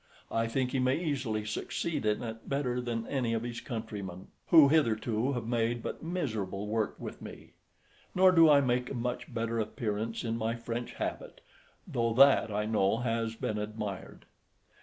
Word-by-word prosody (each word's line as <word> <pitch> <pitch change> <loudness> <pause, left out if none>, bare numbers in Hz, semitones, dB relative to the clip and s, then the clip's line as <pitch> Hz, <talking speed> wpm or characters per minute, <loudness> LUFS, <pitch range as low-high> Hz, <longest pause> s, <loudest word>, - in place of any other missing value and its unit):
I 115 0 +1
think 125 +2 -1
he 135 - 0
may 130 +1 +2
easily 130 -10 -2
succeed 140 +5 -2
in 105 +2 +1
it 115 -1 -7
better 125 -3 0
than 115 -2 -3
any 125 -4 -1
of 115 - -2
his 120 -1 -5
countrymen, 100 -7 -6 0.2
who 160 -5 +8
hitherto 120 -3 +2
have 120 -3 -3
made 115 0 0
but - - -5
miserable 110 - -3
work 110 0 -1
with - - -8
me; - - -11 0.6
nor 185 0 +7
do 165 -3 +7
I 145 -1 +7
make 125 -1 0
a - - -4
much 125 +1 -3
better 115 -1 -2
appearance 110 0 -2
in 115 -1 -1
my 115 +1 -1
French 115 +1 -5
habit, - - -5 0.5
though 115 -1 0
that 135 -4 +6
I 105 +1 -1
know 105 -1 +2
has 115 -1 -1
been 105 -1 -2
admired. 105 -2 -6
115 Hz, 170 wpm, -30 LUFS, 110-130 Hz, 0.6 s, who